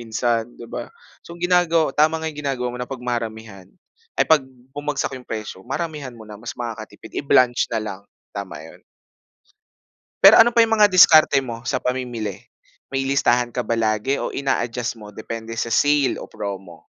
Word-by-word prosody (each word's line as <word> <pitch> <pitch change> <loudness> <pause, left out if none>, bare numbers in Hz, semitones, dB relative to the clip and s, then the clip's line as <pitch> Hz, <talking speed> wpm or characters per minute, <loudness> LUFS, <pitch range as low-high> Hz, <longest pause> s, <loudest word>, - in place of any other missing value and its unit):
minsan, 115 0 -1
'di - - -10
ba? - - -7 0.3
So 170 - -12
ang 175 - -4
ginagawa 170 -4 +3
tama 155 +3 +3
nga 160 0 -4
'yong 150 - -8
ginagawa 135 -4 -2
mo - - -6
na 125 - -5
'pag 130 -2 -7
maramihan 110 -5 -5 0.5
ay, - - +3
'pag 160 -1 +5 0.3
bumagsak 145 -1 -3
'yong 130 -1 -10
presyo, 110 -4 -6
maramihan 140 - -5
mo 110 - -12
na 105 -1 -11
mas 120 - -7
makakatipid, 110 -2 -6
i-blanch 125 -3 +3
na 110 -2 -2
lang 100 -2 -6 0.3
tama 95 -6 -7
'yon. 80 - -14 1.4
Pero - - +10
ano 225 - +7
pa 235 -1 +6
'yong 225 0 +1
mga 210 - +8
diskarte 160 -5 +7
mo 115 -2 -6
sa - - +1
pamimili? 120 -6 -3 0.5
May 135 0 -2
listahan 125 -3 +2
ka 125 - -2
ba 115 - 0
lagi 110 +3 0
o - - -3
ina-adjust 125 -3 -2
mo 105 -2 -11
depende 115 +2 -7
sa 115 - -1
sale 145 +4 +2
o - - -7
promo? 95 -6 -7
120 Hz, 180 wpm, -21 LUFS, 110-145 Hz, 1.4 s, Pero